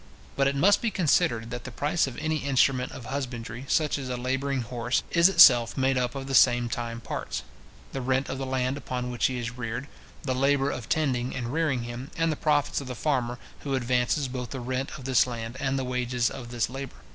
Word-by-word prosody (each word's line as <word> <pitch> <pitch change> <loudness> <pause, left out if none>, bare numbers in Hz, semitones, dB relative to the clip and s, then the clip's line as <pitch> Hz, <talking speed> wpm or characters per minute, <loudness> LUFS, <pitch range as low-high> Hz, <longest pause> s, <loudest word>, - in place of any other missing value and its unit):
But 135 0 +3
it 140 - 0
must 185 +9 +4
be 235 - +1
considered, 120 - +1
that 120 0 -5
the - - -6
price 145 +6 0
of 125 - -7
any 155 0 -1
instrument 135 -2 +2
of 120 - -9
husbandry, 120 -2 -5
such 150 -1 +1
as 130 -2 -5
a 125 - -2
labouring 135 +2 -1
horse, 120 +1 -1
is 170 +1 +6
itself 120 -10 +7
made 135 0 +2
up 125 +1 -1
of 135 -1 -4
the 135 - -5
same 120 -2 +5
time 115 0 -4
parts; - - -4 0.5
the 135 - -4
rent 130 +2 0
of 135 - -4
the 135 - -2
land 130 +1 -1
upon 125 -3 -4
which 120 - +1
he 130 - -3
is 120 -1 -3
reared, 120 +3 -4 0.4
the 130 - -1
labour 135 +1 +2
of 120 - -6
tending 130 -5 0
and 120 -1 -4
rearing 150 -7 0
him, 120 +4 -6
and 165 0 +2
the - - -1
profits 145 -1 +1
of 135 - -8
the 125 - -5
farmer, 125 -3 -1 0.2
who 140 -2 -2
advances 125 +3 +1
both 125 -1 -5
the 135 - -5
rent 130 +4 -3
of 130 - -11
this 130 -1 +4
land, 115 -1 -5
and 135 0 0
the 135 - -1
wages 125 -1 0
of 120 -2 -8
this 120 -1 0
labour. 135 +1 -7
130 Hz, 225 wpm, -27 LUFS, 120-140 Hz, 0.5 s, itself